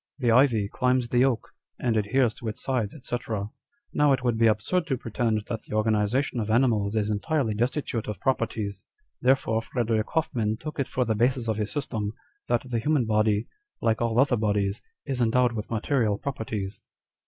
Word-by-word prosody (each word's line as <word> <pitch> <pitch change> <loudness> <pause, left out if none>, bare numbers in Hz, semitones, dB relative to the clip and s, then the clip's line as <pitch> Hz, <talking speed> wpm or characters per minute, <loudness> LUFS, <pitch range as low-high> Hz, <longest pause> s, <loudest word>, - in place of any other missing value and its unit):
The 125 -4 +2
ivy 115 -4 +4
climbs 125 +2 +1
the 125 +1 +4
oak, 125 -5 -1 0.3
and 120 -3 0
adheres 110 +3 +2
to 120 - -8
its 110 - -5
sides, 125 -5 -1
&c. 120 - 0 0.8
Now 145 -1 +4
it 130 - -1
would 120 -2 +2
be 115 0 +4
absurd 115 +12 +1
to 135 -4 0
pretend 115 -2 -1
that 115 -2 -4
the - - -5
organization 110 +5 +1
of 110 -1 -2
animals 110 -3 +2
is 105 -1 +1
entirely 110 +4 0
destitute 120 +1 -1
of 105 -4 -4
properties: 110 -6 -1 0.4
therefore 125 -3 +2
Frederick 115 -2 -1
Hoffman 115 -9 0
took 155 +3 -7
it 140 - 0
for 125 - 0
the 110 - +1
basis 120 +2 +1
of 110 -2 0
his 105 -1 -2
system, 110 -8 -3 0.3
that 130 - 0
the 120 -2 -1
human 145 0 +2
body, 110 0 +2 0.3
like 110 0 +1
all 115 0 +1
other 135 -2 +4
bodies, 105 -1 0 0.2
is 135 -3 -2
endowed 120 +1 +3
with 110 -2 -5
material 115 -2 +1
properties." 110 -7 -4
115 Hz, 180 wpm, -26 LUFS, 110-130 Hz, 0.8 s, ivy